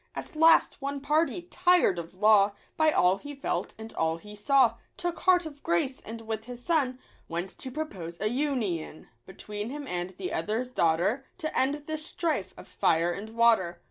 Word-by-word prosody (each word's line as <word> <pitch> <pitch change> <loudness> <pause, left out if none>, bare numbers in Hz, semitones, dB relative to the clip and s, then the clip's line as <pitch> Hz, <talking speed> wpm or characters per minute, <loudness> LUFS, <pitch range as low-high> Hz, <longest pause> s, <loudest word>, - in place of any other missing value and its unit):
At - - -7
last 325 -2 +5
one 280 +1 -3
party, 315 +5 +1
tired 355 - +3
of 170 +2 -8
law 205 0 +5 0.2
By 315 -1 +4
all 185 -10 +3
he 290 +5 -9
felt 275 - -3
and 220 0 -9
all 160 0 0
he 210 +4 -11
saw, 235 +1 +3 0.2
Took 350 -1 -3
heart 360 -2 +4
of 290 -2 -9
grace, 255 +11 0
and 225 +1 -8
with 220 -1 -4
his 245 0 -9
son 280 -7 +1 0.3
Went 175 +3 -3
to 260 - -4
propose 195 - -6
a 215 - 0
union 225 - -2 0.2
Between 210 +3 -6
him 290 +2 -6
and 175 -2 -3
the 190 - -4
other's 220 +9 -2
daughter, 175 +7 +1
To 315 -4 -4
end 285 +3 +1
this 310 0 -3
strife 330 -1 -2
of - - -11
fire 165 +2 +2
and 200 +5 -6
water. 225 -7 +3
235 Hz, 180 wpm, -28 LUFS, 190-295 Hz, 0.3 s, last